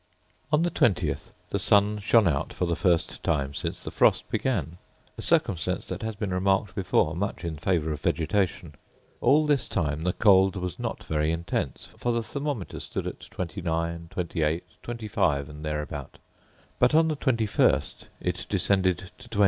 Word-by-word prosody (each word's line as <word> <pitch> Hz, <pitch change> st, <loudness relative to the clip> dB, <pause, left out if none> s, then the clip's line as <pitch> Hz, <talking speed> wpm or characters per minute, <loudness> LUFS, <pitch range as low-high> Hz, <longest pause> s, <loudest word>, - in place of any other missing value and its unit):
On 150 Hz, +2 st, +4 dB
the 175 Hz, -, +1 dB
20th 85 Hz, -, +1 dB, 0.2 s
the -, -, 0 dB
sun 105 Hz, +1 st, +4 dB
shone 105 Hz, 0 st, +4 dB
out 70 Hz, -4 st, 0 dB
for 90 Hz, -, -1 dB
the 85 Hz, -1 st, 0 dB
first 85 Hz, -3 st, +1 dB
time 70 Hz, -4 st, 0 dB
since -, -, -4 dB
the -, -, -5 dB
frost -, -, +3 dB
began; 90 Hz, -, -1 dB, 0.4 s
a -, -, -7 dB
circumstance 85 Hz, -6 st, +1 dB
that -, -, -4 dB
has 110 Hz, -1 st, -3 dB
been 100 Hz, -2 st, -3 dB
remarked 95 Hz, +1 st, +1 dB
before 90 Hz, -5 st, +1 dB
much 95 Hz, -1 st, -3 dB
in 85 Hz, -2 st, -3 dB
favour 80 Hz, 0 st, 0 dB
of 75 Hz, -, -4 dB
vegetation. 85 Hz, -2 st, 0 dB, 0.5 s
All 145 Hz, +5 st, +4 dB
this 145 Hz, -5 st, +2 dB
time 75 Hz, -4 st, -1 dB
the 90 Hz, +2 st, 0 dB
cold 95 Hz, -2 st, +5 dB
was 90 Hz, -3 st, -4 dB
not -, -, -4 dB
very 75 Hz, 0 st, 0 dB
intense, 85 Hz, 0 st, -2 dB
for 120 Hz, -, -3 dB
the 115 Hz, -1 st, 0 dB
thermometer 140 Hz, -, -4 dB
stood -, -, -4 dB
at -, -, -5 dB
29, 85 Hz, -2 st, -3 dB
28, 85 Hz, -3 st, -1 dB, 0.2 s
25, 105 Hz, -12 st, -1 dB
and 75 Hz, +1 st, -10 dB
thereabout; 75 Hz, -1 st, -4 dB, 0.6 s
but 125 Hz, +4 st, +4 dB
on 160 Hz, 0 st, +5 dB
the 155 Hz, -2 st, -1 dB
21st 115 Hz, -7 st, +1 dB, 0.2 s
it -, -, -2 dB
descended 95 Hz, -2 st, +1 dB
to 125 Hz, -2 st, -13 dB
20. 105 Hz, -, -3 dB
95 Hz, 165 wpm, -27 LUFS, 80-110 Hz, 0.6 s, cold